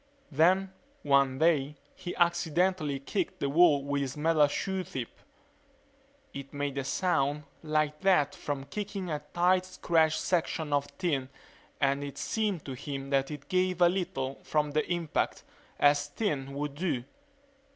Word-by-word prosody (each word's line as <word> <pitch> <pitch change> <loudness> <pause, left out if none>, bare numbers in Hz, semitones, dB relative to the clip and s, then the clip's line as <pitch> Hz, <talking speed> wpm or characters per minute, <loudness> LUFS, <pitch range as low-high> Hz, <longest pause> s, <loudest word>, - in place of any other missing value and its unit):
Then 185 +6 +3 0.3
one 140 -2 +3
day 150 -2 +2 0.2
he 175 - -6
accidentally 170 -3 +1
kicked 185 +5 -3
the 140 - 0
wall 155 -3 +5
with 140 0 -1
his 135 +1 -4
metal 155 -1 +4
shoe 190 +6 -2
tip. 130 -7 -5 1.2
It 140 0 -7
made 145 -1 -2
a - - -2
sound 145 -1 0 0.2
like 155 -1 0
that 185 -7 +3
from 140 -2 -4
kicking 195 +1 -5
a 150 - -1 0.2
tight 180 +1 +4
stretched 160 -4 +1
section 160 -3 -1
of 145 0 +1
tin 145 -8 -1 0.5
and 140 0 +1
it 140 -1 -7
seemed 210 -7 -1
to 135 - -5
him 135 +1 -5
it 140 +1 -1
gave 185 -1 +1
a 175 -1 +6
little 135 -8 -3
from 150 -1 0
the 155 +4 -1
impact, 170 -3 -1 0.4
as 145 0 +4
tin 145 -6 -2
would 145 0 -3
do. 145 -5 -2
150 Hz, 145 wpm, -29 LUFS, 140-175 Hz, 1.2 s, a